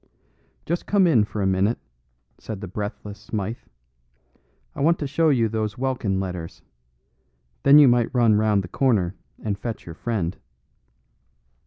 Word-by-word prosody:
"Just 170 +2 -3
come 200 -2 +4
in 125 -11 +4
for 105 -1 -4
a - - +1
minute," 95 +4 +1 0.6
said 110 -3 -7
the 100 - -6
breathless 105 +1 -6
Smythe. 105 +1 -4 1.1
"I - - -6
want 165 +4 +3
to 145 - -4
show 155 +4 +2
you 120 -6 +3
those 110 -2 -3
Welkin 120 -7 -1
letters. 90 -3 -6 1.0
Then 140 +1 +7
you 145 -2 +8
might 120 -1 +3
run 120 -4 +4
round 105 -2 +2
the - - -7
corner 100 -5 +1 0.3
and 100 -2 -2
fetch 115 -2 -5
your 85 - -8
friend." 95 -2 -3
110 Hz, 150 wpm, -23 LUFS, 100-130 Hz, 1.1 s, you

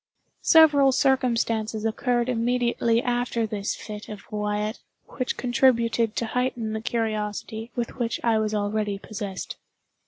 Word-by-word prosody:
Several 295 -5 +6
circumstances 230 -5 +1
occurred 240 +2 0
immediately 235 -1 +1
after 245 -2 0
this 205 -2 -3
fit 210 -1 -8
of 210 -2 -8
Wyatt 210 0 -2 0.3
which 255 -2 -3
contributed 235 -3 +2
to 235 - -1
heighten 240 -2 -1
the 220 - -3
curiosity 220 0 -3
with 240 +1 -3
which 235 -1 -1
I 225 -2 +3
was 215 0 -1
already 205 0 -1
possessed. 200 -2 -6
230 Hz, 125 wpm, -25 LUFS, 215-245 Hz, 0.3 s, Several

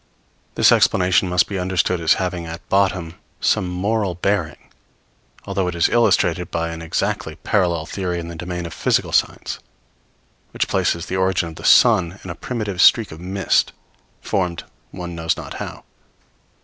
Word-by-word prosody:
This - - +5
explanation 90 0 +3
must 90 -1 +3
be 100 -2 -3
understood 90 -1 0
as 80 - +4
having 90 -2 -3
at 85 +2 -8
bottom 95 -3 +1 0.2
some 90 - +1
moral 95 +1 -1
bearing; 90 -4 -1 0.9
although 95 -2 -1
it 90 - -3
is 85 - +3
illustrated 90 -7 +2
by 85 0 -2
an 85 0 -6
exactly 80 - -2
parallel 85 -5 0
theory 90 -2 -3
in 85 - -6
the 85 - -7
domain 90 +1 -5
of 85 - -7
physical - - 0
science, - - 0 0.9
which - - -1
places 85 +1 0
the 95 - -3
origin 95 -2 +1
of 80 - -11
the - - -10
sun 90 +2 +4
in 90 - -6
a - - -7
primitive 105 -7 -3
streak 115 -3 +5
of 80 - -10
mist, 95 +2 0 0.5
formed 90 -4 -2 0.3
one 90 -2 -7
knows 80 -1 -1
not - - -7
how. - - -7
90 Hz, 160 wpm, -20 LUFS, 85-95 Hz, 0.9 s, This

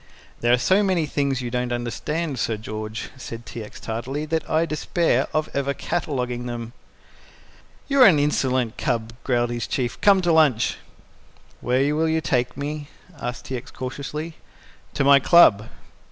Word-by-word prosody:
"There 120 - +2
are 125 - +6
so 190 +11 +3
many 185 -5 +1
things 140 -3 -1
you 120 - -4
don't 125 0 -1
understand, 135 +5 -3
Sir 110 -1 -1
George," 110 0 -6
said 115 -2 -8
T. 115 - -7
X. 105 - -11
tartly, 130 +7 -4
"that 160 +1 -2
I 160 +1 +2
despair 155 -3 0
of 155 0 0
ever 140 0 -1
cataloguing 125 -7 -3
them." 120 -1 -6 1.1
"You 275 -1 +3
are 255 - +10
an 170 -6 +5
insolent 130 -5 0
cub," 115 -4 -1
growled 120 -2 +1
his 120 -2 -3
Chief. 120 -3 -2
"Come 200 -2 +6
to 175 -1 +2
lunch." 145 -8 +3 0.8
"Where 135 +4 +1
will 160 +1 +1
you 160 0 +1
take 125 -5 -1
me?" 145 +1 -4 0.3
asked 120 0 -5
T. 130 - -4
X. 120 - -10
cautiously. 145 +5 -6 0.6
"To - - +1
my 140 0 +7
club." 125 - +5
135 Hz, 165 wpm, -23 LUFS, 120-155 Hz, 1.1 s, are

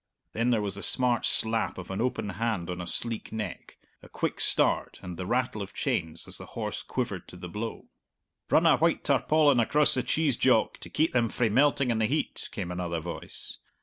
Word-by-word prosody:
Then 115 +2 +1
there 115 -4 +2
was 100 -2 -2
the 100 - -6
smart 125 0 +4
slap 110 0 +1
of 95 0 -7
an 95 - -2
open 125 -4 -1
hand 100 -4 -2
on 90 0 -5
a 90 - -6
sleek 115 +4 -3
neck, 110 -1 -6 0.2
a - - -15
quick - - -3
start, - - +3
and 90 -1 -6
the 90 +1 -5
rattle 120 -3 0
of 100 - -8
chains 80 -1 -2
as - - -2
the - - -9
horse - - -3
quivered - - -4
to - - -11
the 90 - -7
blow. 105 +6 -6 0.6
"Run - - +4
a - - +6
white - - +1
tarpaulin 150 -4 +3
across 150 +6 +3
the 130 - +2
cheese, 145 -2 0
Jock, 125 -4 +2
to - - -10
keep 160 - +1
them 120 -2 +2
frae 120 0 0
melting 135 +2 +3
in 115 - 0
the 110 - +2
heat," 150 +6 -2
came 90 -4 -5
another 90 -2 -3
voice. 85 +1 -5
110 Hz, 210 wpm, -28 LUFS, 95-125 Hz, 0.6 s, a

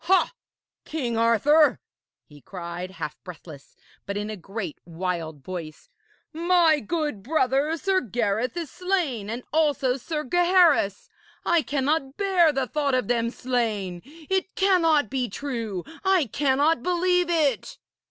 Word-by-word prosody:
'Ha! 380 +6 +3 0.5
King 255 -7 -3
Arthur!' 235 +7 +4 0.5
he 145 -1 -17
cried, 175 +1 -6
half 190 - -7
breathless, 160 -5 -12 0.3
but 200 0 -3
in 210 +1 -3
a - - -4
great 195 -2 -6
wild 165 -4 -4
voice, 165 -3 -8 0.4
'my 335 -1 +3
good 295 -3 -3
brother, 280 +4 +1
Sir 380 +2 +1
Gareth, 230 - -1
is 330 -5 -4
slain, 335 - -1
and 235 +3 -4
also 285 -5 +2
Sir 300 +4 -4
Gaheris! 345 - +3 0.4
I 345 -1 +3
cannot 280 -1 -1
bear 375 -5 +4
the 270 -2 -1
thought 285 0 0
of 250 -4 -1
them 235 -1 +1
slain. 220 -8 -2
It 335 +7 -4
cannot 330 - +3
be 255 -2 -1
true! 225 -6 -4 0.2
I 380 -5 +3
cannot 280 +4 +1
believe 360 +2 +1
it!' 300 -8 0
270 Hz, 135 wpm, -25 LUFS, 210-325 Hz, 0.5 s, Arthur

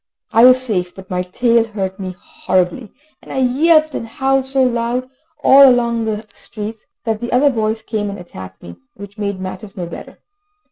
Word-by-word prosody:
I 230 +2 +7
was 255 0 +7
safe, 185 -8 -2
but 190 -1 -12
my 180 0 0
tail 230 +6 +2
hurt 195 -4 -5
me 185 -2 -5
horribly, 185 +5 -2 0.3
and - - -13
I - - -4
yelped 310 +4 +3
and 230 - -4
howled 270 +3 0
so 265 0 +1
loud 245 +1 -1 0.4
all 275 0 +8
along 235 -2 +1
the 215 0 -3
streets, 215 0 -8 0.2
that 225 -1 -2
the 240 - -4
other 275 +3 +4
dogs 220 -2 -2
came 215 -2 -3
and 200 - -6
attacked 95 - -11
me, 85 0 -10 0.2
which 200 +1 -11
made 200 -2 -3
matters 190 +2 -8
no 180 - -3
better. 170 - -10
220 Hz, 185 wpm, -18 LUFS, 190-250 Hz, 0.4 s, all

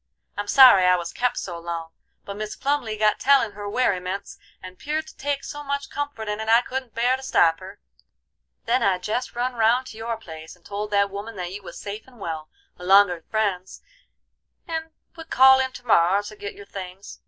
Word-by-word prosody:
I'm 205 0 -4
sorry 245 -7 +8
I 180 0 +5
was 170 -1 -5
kep' 245 0 0
so 175 -3 -5
long, 165 -1 -5 0.3
but 200 - -6
Mis 215 0 -5
Plumly 270 -6 -1
got 215 0 +2
tellin' 270 -5 +4
her 205 0 -7
werryments, 195 -4 -2 0.2
and 185 0 -11
'peared 310 +2 -2
to 315 - -14
take 280 0 -2
so 295 - -7
much 280 0 -4
comfort 285 -7 -4
in 210 0 -3
it 220 0 -4
I 230 +1 +6
couldn't 255 -1 -6
bear 245 +3 +2
to 265 - -9
stop 165 -11 +3
her. 190 +2 -11 0.9
Then 245 +2 +2
I 190 -2 +2
jest 215 +8 -3
run 250 +1 -1
round 235 +2 +2
to 220 - -10
your 230 0 -3
place 160 -6 -11
and 180 - -29
told 205 +1 -4
that 200 -1 +2
woman 205 +3 -7
that 180 -2 -5
you 205 - -7
was - - -10
safe 210 +3 -7
and 250 -3 -18
well, 160 -4 -5 0.3
along'r 180 -1 +4
friends, 200 -4 -2 0.8
and 325 -1 -4 0.3
would 325 -1 -11
call 265 +1 +7
in 260 0 0
to 250 - -11
morrer 195 -2 +4
to 215 +1 -9
get 205 -1 -7
your 200 - -12
things. 195 0 -9
210 Hz, 205 wpm, -24 LUFS, 190-255 Hz, 0.9 s, sorry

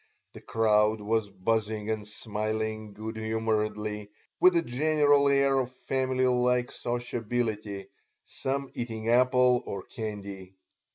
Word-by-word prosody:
The - - -11
crowd 110 -1 +2
was 105 0 0
buzzing 105 +2 -1
and 105 -1 -3
smiling 110 0 -3
good 110 +2 -6
humoredly, 110 -1 -2 0.3
with 180 -1 +6
a 170 - +3
general 145 +1 +3
air 140 -1 +3
of 125 -1 -2
family 130 0 -1
like 125 0 +2
sociability, 115 -4 -3 0.4
some 135 0 -3
eating 115 -2 -4
apple 125 0 +4
or 100 - -5
candy. 100 -4 -7
110 Hz, 115 wpm, -28 LUFS, 105-125 Hz, 0.4 s, with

